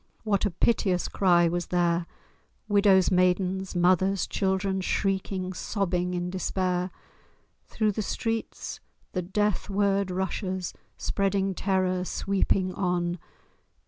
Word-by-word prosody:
What 210 -1 +1
a - - -1
piteous 185 -1 +1
cry 175 -3 +4
was 175 +1 -2
there! 170 -1 +1 0.6
Widows, 200 -3 +4
maidens, 185 +1 +1
mothers, 185 +2 +3
children, 190 0 0
Shrieking, 190 -1 -1
sobbing 180 -3 -1
in 175 0 -2
despair! 185 -1 -1 0.8
Through 215 -1 0
the 215 - -2
streets 225 +2 -3 0.3
the 185 - -1
death 210 +3 -1
word 200 -1 +1
rushes, 185 0 -2 0.2
Spreading 195 -1 0
terror, 185 -1 0
sweeping 190 0 0
on. 175 -2 -1
190 Hz, 110 wpm, -27 LUFS, 180-195 Hz, 0.8 s, cry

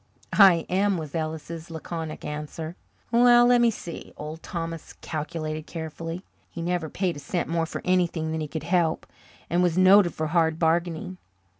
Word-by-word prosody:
"I 185 -5 +6
am," 195 +1 +1
was 155 -3 -6
Ellis's 160 +1 -4
laconic 160 -1 -6
answer. 150 +2 -5 0.4
"Well, 240 0 +6
lemme 240 -1 +5
see." 175 -6 -7
Old 155 +2 -7
Thomas 165 -2 -5
calculated 155 0 -5
carefully. 165 +2 -6 0.2
He 170 - -6
never 175 -2 -1
paid 180 -3 -1
a - - -6
cent 170 +5 -2
more 165 0 0
for - - -6
anything 175 -3 +1
than 160 0 -2
he 155 - -3
could 160 +1 -5
help, 175 -3 +1 0.4
and 175 +1 +1
was 175 -1 +2
noted 185 -1 +6
for 155 - -2
hard 160 -1 +2
bargaining. 170 +2 0
165 Hz, 160 wpm, -26 LUFS, 160-180 Hz, 0.4 s, I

